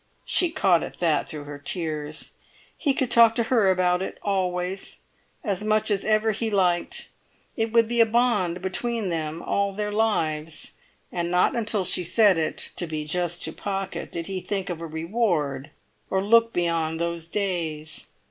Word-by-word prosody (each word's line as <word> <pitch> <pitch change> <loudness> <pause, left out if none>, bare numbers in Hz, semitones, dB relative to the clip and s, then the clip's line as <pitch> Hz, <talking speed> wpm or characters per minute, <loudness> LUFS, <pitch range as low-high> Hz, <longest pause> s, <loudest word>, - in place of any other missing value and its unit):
She 355 - +4
caught 195 - +3
at - - -7
that 165 -4 +1
through 150 -2 -6
her 145 0 -8
tears. 155 -1 -3 0.4
He 280 -4 0
could 260 -3 -1
talk 230 -1 +7
to 235 - +2
her 225 -4 +3
about 180 -1 +2
it, 190 - -4
always, 185 -1 -1 0.5
as 205 -4 -1
much 215 0 +1
as 200 -1 +1
ever 215 +1 +2
he 220 +2 -2
liked; 180 -4 +1 0.5
it 225 -1 -1
would 230 -1 +4
be 235 0 +2
a - - +7
bond 210 -7 +1
between 220 +2 -1
them 160 -1 -3
all 200 0 0
their 210 +1 -3
lives. 165 -8 0 0.4
And 175 -1 -2
not 180 +6 +3
until 210 -4 0
she 180 - 0
said 190 0 +4
it, 160 - -2
to 175 - 0
be 155 -1 -4
just 175 +2 -1
to - - -2
Pocket, 195 -1 -4
did 165 -1 -4
he 190 0 -4
think 185 0 -3
of 165 -1 -5
a 165 - -4
reward 160 - -1 0.4
or 190 0 +1
look 230 +2 +5
beyond 165 -3 0
those 170 -1 -2
days. 165 -6 -2
185 Hz, 175 wpm, -25 LUFS, 165-215 Hz, 0.5 s, talk